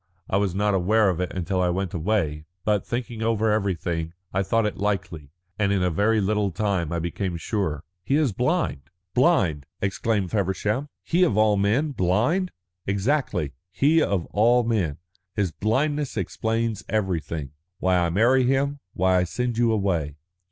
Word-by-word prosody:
I 95 Hz, -, +1 dB
was 100 Hz, -3 st, 0 dB
not 105 Hz, +1 st, +1 dB
aware 100 Hz, +3 st, +3 dB
of 90 Hz, -, -4 dB
it 90 Hz, -, -2 dB
until 95 Hz, +1 st, -1 dB
I 90 Hz, -, +2 dB
went 95 Hz, 0 st, -2 dB
away, 80 Hz, -4 st, -1 dB, 0.2 s
but, 105 Hz, -3 st, +2 dB
thinking 120 Hz, -2 st, -4 dB
over 110 Hz, -1 st, +1 dB
everything, 85 Hz, -5 st, -1 dB, 0.2 s
I 95 Hz, -, +2 dB
thought 115 Hz, +3 st, +1 dB
it 105 Hz, -, -2 dB
likely, 90 Hz, -8 st, -2 dB, 0.3 s
and 100 Hz, -2 st, +2 dB
in 95 Hz, -2 st, +1 dB
a 90 Hz, -, +1 dB
very 110 Hz, +6 st, +2 dB
little 105 Hz, 0 st, +1 dB
time 95 Hz, -4 st, -1 dB
I 85 Hz, -, -1 dB
became 85 Hz, +2 st, -3 dB
sure." 80 Hz, -5 st, -2 dB, 0.2 s
"He 135 Hz, -, +1 dB
is 150 Hz, -5 st, +2 dB
blind." 125 Hz, -, -1 dB, 0.2 s
"Blind!" 95 Hz, -, +2 dB
exclaimed 100 Hz, -1 st, -1 dB
Feversham. 105 Hz, +6 st, -1 dB
"He, 175 Hz, +2 st, +1 dB
of 115 Hz, -, +3 dB
all 110 Hz, -1 st, +4 dB
men, 110 Hz, +10 st, +1 dB
blind!" 125 Hz, -, +1 dB, 0.4 s
"Exactly," 100 Hz, -, 0 dB
said -, -, -21 dB
Ethne. 65 Hz, -, -35 dB, 0.2 s
"He 155 Hz, +4 st, +4 dB
of 100 Hz, -, 0 dB
all 120 Hz, +4 st, +4 dB
men. 100 Hz, -11 st, 0 dB, 0.4 s
His 100 Hz, -5 st, 0 dB
blindness 135 Hz, -, 0 dB
explains 110 Hz, +3 st, -1 dB
everything 85 Hz, -8 st, -2 dB, 0.3 s
why 90 Hz, 0 st, +2 dB
I 85 Hz, -1 st, +1 dB
marry 120 Hz, +9 st, +4 dB
him, 135 Hz, +3 st, +1 dB, 0.2 s
why 95 Hz, 0 st, +3 dB
I -, -, +2 dB
send 120 Hz, +5 st, -2 dB
you 120 Hz, -1 st, +3 dB
away. 90 Hz, -9 st, 0 dB
100 Hz, 170 wpm, -24 LUFS, 90-115 Hz, 0.4 s, all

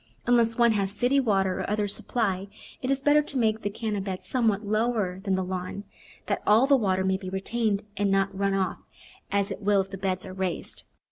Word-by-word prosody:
Unless 235 Hz, -2 st, +3 dB
one 235 Hz, -1 st, +5 dB
has 200 Hz, -3 st, 0 dB
city 245 Hz, +7 st, +2 dB
water 195 Hz, -7 st, +1 dB
or -, -, -3 dB
other 210 Hz, 0 st, 0 dB
supply 200 Hz, -2 st, -2 dB, 0.3 s
it 255 Hz, -, -2 dB
is 275 Hz, 0 st, 0 dB
better 295 Hz, +1 st, +5 dB
to 285 Hz, -2 st, -6 dB
make 220 Hz, -2 st, +1 dB
the 205 Hz, -, -1 dB
Canna 210 Hz, -1 st, -3 dB
bed 190 Hz, -1 st, -5 dB
somewhat 220 Hz, -5 st, 0 dB
lower 215 Hz, -3 st, 0 dB
than 195 Hz, -1 st, 0 dB
the 190 Hz, -, 0 dB
lawn, 185 Hz, +2 st, -4 dB, 0.4 s
that -, -, -1 dB
all 220 Hz, +5 st, +6 dB
the 280 Hz, 0 st, +5 dB
water 190 Hz, -6 st, +1 dB
may 190 Hz, 0 st, +1 dB
be 190 Hz, -1 st, -7 dB
retained 205 Hz, +2 st, -1 dB
and 205 Hz, -1 st, +1 dB
not 195 Hz, 0 st, +1 dB
run 195 Hz, 0 st, +1 dB
off, 190 Hz, -1 st, -1 dB, 0.5 s
as 200 Hz, 0 st, +1 dB
it 195 Hz, -, -5 dB
will 205 Hz, 0 st, +3 dB
if 190 Hz, 0 st, -2 dB
the 195 Hz, -, -6 dB
beds 185 Hz, -1 st, -1 dB
are 185 Hz, -, -8 dB
raised. 190 Hz, -2 st, -4 dB
200 Hz, 215 wpm, -27 LUFS, 190-225 Hz, 0.5 s, all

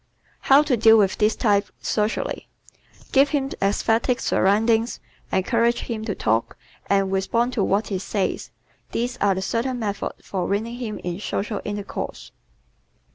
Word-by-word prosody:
How 275 Hz, +2 st, +5 dB
to 285 Hz, -4 st, +1 dB
Deal 225 Hz, 0 st, +6 dB
with 195 Hz, -3 st, +2 dB
This 215 Hz, 0 st, +3 dB
Type 205 Hz, -3 st, +2 dB
Socially 210 Hz, +1 st, -2 dB, 0.6 s
¶ -, -, -26 dB
Give 275 Hz, +1 st, +5 dB
him 275 Hz, -2 st, -1 dB
esthetic 225 Hz, +5 st, +1 dB
surroundings, 225 Hz, +4 st, +2 dB, 0.3 s
encourage 235 Hz, +5 st, +1 dB
him 220 Hz, -2 st, -4 dB
to 205 Hz, -4 st, -2 dB
talk, 115 Hz, +1 st, 0 dB, 0.3 s
and 195 Hz, -1 st, +2 dB
respond 230 Hz, +6 st, 0 dB
to 215 Hz, -, +1 dB
what 200 Hz, +3 st, 0 dB
he 195 Hz, -3 st, -2 dB
says. 200 Hz, 0 st, -2 dB, 0.4 s
These 245 Hz, +1 st, -2 dB
are 200 Hz, -4 st, +2 dB
the 190 Hz, -, -3 dB
certain 245 Hz, +5 st, -1 dB
methods 205 Hz, -4 st, -4 dB
for 185 Hz, -3 st, -2 dB
winning 225 Hz, +4 st, -2 dB
him 225 Hz, -4 st, -4 dB
in 175 Hz, +1 st, -3 dB
social 210 Hz, 0 st, -3 dB
intercourse. 205 Hz, -1 st, -5 dB
215 Hz, 150 wpm, -23 LUFS, 200-235 Hz, 0.6 s, Deal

